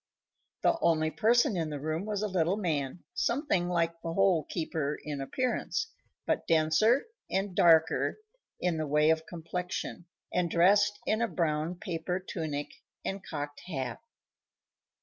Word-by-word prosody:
The 335 Hz, -, +3 dB
only 155 Hz, -1 st, +2 dB
person 235 Hz, -, +3 dB
in 165 Hz, -3 st, -1 dB
the 145 Hz, -1 st, -4 dB
room 155 Hz, +5 st, -2 dB
was 210 Hz, -1 st, -1 dB
a -, -, +1 dB
little 185 Hz, 0 st, +1 dB
man, 155 Hz, -5 st, -2 dB
something 235 Hz, -, 0 dB
like 170 Hz, -1 st, 0 dB
the 165 Hz, -, -3 dB
Hole 180 Hz, -4 st, +3 dB
keeper 155 Hz, -3 st, -2 dB
in 145 Hz, -2 st, -4 dB
appearance, 255 Hz, -, -1 dB, 0.3 s
but -, -, 0 dB
denser 165 Hz, -, +4 dB, 0.2 s
and 195 Hz, 0 st, -1 dB
darker 160 Hz, -2 st, +4 dB, 0.4 s
in 175 Hz, -2 st, 0 dB
the 155 Hz, -1 st, -2 dB
way 150 Hz, +2 st, +4 dB
of 160 Hz, 0 st, -1 dB
complexion, 175 Hz, +1 st, -5 dB, 0.3 s
and 180 Hz, -1 st, +1 dB
dressed 205 Hz, +5 st, +4 dB
in 215 Hz, +1 st, +1 dB
a 235 Hz, -, +2 dB
brown 165 Hz, -2 st, -1 dB
paper 180 Hz, +1 st, -3 dB
tunic 150 Hz, -6 st, -4 dB, 0.3 s
and 195 Hz, 0 st, -3 dB
cocked 145 Hz, -4 st, -5 dB
hat. 130 Hz, -, -3 dB
170 Hz, 145 wpm, -30 LUFS, 155-195 Hz, 0.4 s, denser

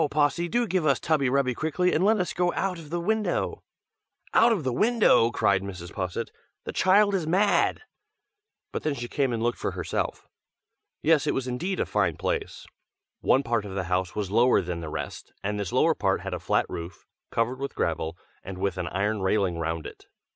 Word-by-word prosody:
Possy, 150 Hz, +4 st, +1 dB
do 240 Hz, +4 st, +1 dB
give 185 Hz, -5 st, 0 dB
us 140 Hz, -3 st, +3 dB
tubby 150 Hz, -5 st, +1 dB
rubby 130 Hz, -1 st, +2 dB
quickly, 160 Hz, +7 st, 0 dB
and 165 Hz, -, +2 dB
let 215 Hz, +2 st, +4 dB
us 180 Hz, -, -1 dB
get 175 Hz, 0 st, +1 dB
out 185 Hz, -3 st, -1 dB
of 155 Hz, -3 st, -11 dB
the 175 Hz, +2 st, -2 dB
window!" 215 Hz, +4 st, -1 dB, 0.7 s
"Out 235 Hz, +1 st, +6 dB
of 200 Hz, -9 st, 0 dB
the 130 Hz, -2 st, -1 dB
window!" 215 Hz, -, +4 dB
cried 100 Hz, -5 st, +2 dB
Mrs. 90 Hz, -3 st, -8 dB
Posset; 90 Hz, -2 st, -3 dB, 0.3 s
"The -, -, -6 dB
child 200 Hz, +2 st, +4 dB
is 180 Hz, -5 st, 0 dB
mad!" 195 Hz, -, +2 dB, 0.9 s
but -, -, -3 dB
then 150 Hz, -2 st, -1 dB
she 120 Hz, -2 st, -5 dB
came 135 Hz, 0 st, 0 dB
and 115 Hz, -1 st, -2 dB
looked 120 Hz, 0 st, 0 dB
for -, -, -2 dB
herself. -, -, -3 dB, 0.8 s
Yes, 160 Hz, -2 st, +3 dB
it -, -, +1 dB
was 135 Hz, -1 st, -2 dB
indeed 175 Hz, +10 st, -2 dB
a -, -, +1 dB
fine -, -, 0 dB
place. 460 Hz, -4 st, -3 dB, 0.5 s
One 135 Hz, -, +3 dB
part 115 Hz, -3 st, 0 dB
of 100 Hz, -2 st, -7 dB
the 95 Hz, -, -1 dB
house 90 Hz, 0 st, -1 dB
was 100 Hz, -3 st, -3 dB
lower 120 Hz, +4 st, +4 dB
than 90 Hz, -2 st, -3 dB
the 80 Hz, -, -5 dB
rest, -, -, -6 dB
and 105 Hz, +1 st, -2 dB
this 100 Hz, -4 st, -3 dB
lower -, -, +4 dB
part -, -, 0 dB
had -, -, -5 dB
a -, -, -3 dB
flat -, -, +1 dB
roof, 85 Hz, +2 st, -7 dB, 0.2 s
covered 120 Hz, +3 st, -1 dB
with 140 Hz, 0 st, -4 dB
gravel, 80 Hz, +1 st, -2 dB, 0.3 s
and 95 Hz, -1 st, -7 dB
with 95 Hz, -1 st, -2 dB
an 90 Hz, -, -2 dB
iron 100 Hz, +4 st, -1 dB
railing 95 Hz, -3 st, +1 dB
round 80 Hz, -1 st, -2 dB
it. -, -, -10 dB
125 Hz, 205 wpm, -26 LUFS, -, 0.9 s, Out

